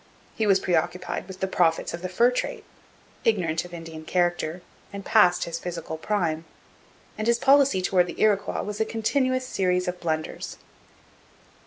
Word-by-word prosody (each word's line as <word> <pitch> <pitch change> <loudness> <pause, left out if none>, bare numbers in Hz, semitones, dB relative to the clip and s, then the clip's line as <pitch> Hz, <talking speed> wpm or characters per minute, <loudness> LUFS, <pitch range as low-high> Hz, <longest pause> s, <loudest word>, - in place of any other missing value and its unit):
He 220 - 0
was 195 -1 +5
preoccupied 175 +1 -1
with 190 -1 -10
the 190 - +1
profits 170 -3 +1
of 170 - -5
the 185 - -4
fur 235 +7 +4
trade, 440 - -3 0.6
ignorant 175 -7 +1
of 175 - -12
Indian 165 -2 -8
character, 175 0 0 0.3
and 200 -1 -7
past 180 0 +4
his 170 0 -4
physical 170 -2 -5
prime; 165 -3 -1 0.8
and 215 - -1
his 235 0 +4
policy 275 -7 +4
towards 180 -1 +3
the - - -8
Iroquois 205 -2 +2
was 210 +2 -4
a - - +3
continuous 255 +4 0
series 180 -4 0
of 180 0 -3
blunders. 155 -2 -3
180 Hz, 160 wpm, -25 LUFS, 170-215 Hz, 0.8 s, was